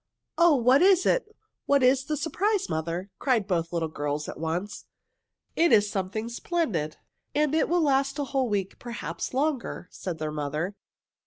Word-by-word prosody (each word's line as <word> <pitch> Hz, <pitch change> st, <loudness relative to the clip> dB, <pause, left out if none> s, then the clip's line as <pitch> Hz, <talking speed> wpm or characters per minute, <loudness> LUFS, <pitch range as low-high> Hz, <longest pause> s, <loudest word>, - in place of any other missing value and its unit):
"Oh, 340 Hz, -3 st, +6 dB
what 255 Hz, +3 st, +4 dB
is 375 Hz, -1 st, +5 dB
it? -, -, +2 dB, 0.4 s
What 280 Hz, -1 st, +4 dB
is 260 Hz, +1 st, +4 dB
the 305 Hz, 0 st, -2 dB
surprise, 385 Hz, +7 st, 0 dB
mother?" 170 Hz, +4 st, -3 dB
cried 245 Hz, -7 st, +2 dB
both 170 Hz, -4 st, -1 dB
little 165 Hz, -2 st, -1 dB
girls 145 Hz, -1 st, -3 dB
at -, -, -7 dB
once. 170 Hz, +6 st, -3 dB, 0.7 s
"It 340 Hz, 0 st, +3 dB
is 205 Hz, -1 st, +4 dB
something 200 Hz, +3 st, -3 dB
splendid, 235 Hz, -, -2 dB, 0.4 s
and 300 Hz, 0 st, +2 dB
it 315 Hz, -, +2 dB
will 345 Hz, -1 st, +3 dB
last 275 Hz, -1 st, +2 dB
a 290 Hz, -, 0 dB
whole 270 Hz, -2 st, -1 dB
week, 195 Hz, -2 st, -2 dB
perhaps 240 Hz, -1 st, -5 dB
longer," 270 Hz, -, -1 dB
said 180 Hz, -4 st, -5 dB
their 155 Hz, -1 st, -3 dB
mother. 150 Hz, +5 st, -3 dB
235 Hz, 165 wpm, -27 LUFS, -, 0.7 s, Oh